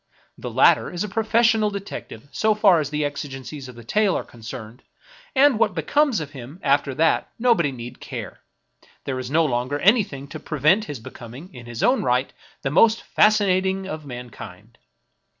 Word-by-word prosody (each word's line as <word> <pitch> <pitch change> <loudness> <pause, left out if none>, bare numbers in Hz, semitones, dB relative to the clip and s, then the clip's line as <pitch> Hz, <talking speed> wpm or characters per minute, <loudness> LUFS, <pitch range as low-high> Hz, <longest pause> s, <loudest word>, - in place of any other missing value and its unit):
The - - -7
latter - - +4
is 175 +1 -3
a - - -3
professional 220 +1 +2
detective 200 - -8
so 215 -1 +1
far 200 -5 +5
as 150 -2 -2
the 150 0 -1
exigencies 140 -1 -6
of 125 - -11
the 120 - -11
tale 210 - +1
are - - -4
concerned, 115 0 -10 0.5
and 270 -4 +5
what 210 -5 +2
becomes 255 - +1
of 150 -2 -6
him 135 +4 -10
after 140 -1 +1
that 160 +3 +2
nobody 225 - +2
need 120 -1 -9
care, - - -7 0.3
— - - -30
there 130 -2 -3
is 125 -1 -5
no 160 +3 +3
longer 130 +1 -1
any 210 - +4
thing 140 -7 -9
to 155 - -7
prevent 155 +8 +2
his 145 - -6
becoming, 130 +6 -11
in 120 -2 -11
his 120 -1 -5
own 255 +1 +3
right, 125 +1 0 0.3
the 135 - -1
most 220 +8 +4
fascinating 190 -2 +2
of 155 -5 -6
mankind. 120 -5 -10
150 Hz, 180 wpm, -23 LUFS, 130-205 Hz, 0.5 s, far